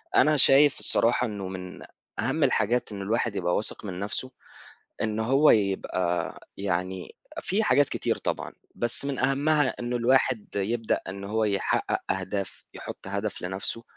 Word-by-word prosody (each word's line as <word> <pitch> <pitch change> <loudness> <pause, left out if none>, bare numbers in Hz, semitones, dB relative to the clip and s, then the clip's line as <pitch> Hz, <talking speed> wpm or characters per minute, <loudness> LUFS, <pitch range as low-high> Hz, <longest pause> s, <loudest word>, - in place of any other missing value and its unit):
أنا 150 0 +5
شايف 140 +2 +6
الصراحة 115 +4 +3
إنه 100 -3 -5
من 90 -1 -7 0.4
أهم 135 +7 0
الحاجات 120 -3 +1
إنه 100 -1 -6
الواحد 115 +1 -1
يبقى 90 -2 0
واثق 105 - -1
من 90 -3 -5
نفسه، 105 +6 -2 0.7
إنه 110 0 -1
هو 135 +5 +5
يبقى 95 -4 0 0.2
يعني 95 -1 -3 0.3
في 200 +5 0
حاجات 145 -8 +3
كتير - - -1
طبعًا، - - -3 0.2
بس 120 +3 +1
من 140 -2 -2
أهمها 140 +2 +2
إنه 120 0 -2
الواحد 125 -1 +2
يبدأ 110 +3 0
إنه 100 +1 -7
هو 110 0 +1
يحقق 100 -2 0
أهداف 95 0 -4
يحط - - -9
هدف 100 +2 -3
لنفسه 95 +5 -2
110 Hz, 145 wpm, -26 LUFS, 100-130 Hz, 0.7 s, شايف